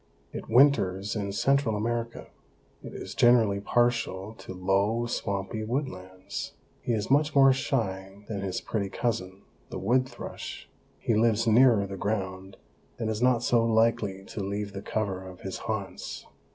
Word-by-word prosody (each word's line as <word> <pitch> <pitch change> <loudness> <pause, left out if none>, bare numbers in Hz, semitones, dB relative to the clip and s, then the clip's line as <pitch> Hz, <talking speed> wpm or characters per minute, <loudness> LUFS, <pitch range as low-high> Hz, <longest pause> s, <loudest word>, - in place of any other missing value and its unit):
It - - -7
winters 110 -6 +4
in 100 -2 -2
Central 135 +2 +2
America. 115 +2 -2 0.6
It - - -9
is - - -7
generally 115 -5 +4
partial 115 -3 0
to - - -9
low, 100 +5 +1
swampy 100 -1 -3
woodlands. 100 -7 -4 0.3
He 120 - -1
is 110 +2 -2
much 145 +2 +3
more 135 -1 +7
shy 100 -7 -3
than 105 -3 -4
his 95 -2 -3
pretty 100 -3 -2
cousin, 100 -4 -3 0.3
the - - -5
wood 125 +7 +1
thrush; - - -8 0.3
he 115 - 0
lives 115 0 +3
nearer 115 -2 +5
the 100 0 -6
ground 95 -2 -3 0.4
and 110 -2 -1
is 110 +1 -3
not 125 -2 +3
so 120 -1 +3
likely 110 -4 +1
to 105 - -6
leave 100 +1 -3
the 100 - -5
cover 100 -4 -2
of 95 -1 -11
his 95 - -5
haunts. 100 -3 -4
110 Hz, 150 wpm, -28 LUFS, 95-120 Hz, 0.6 s, more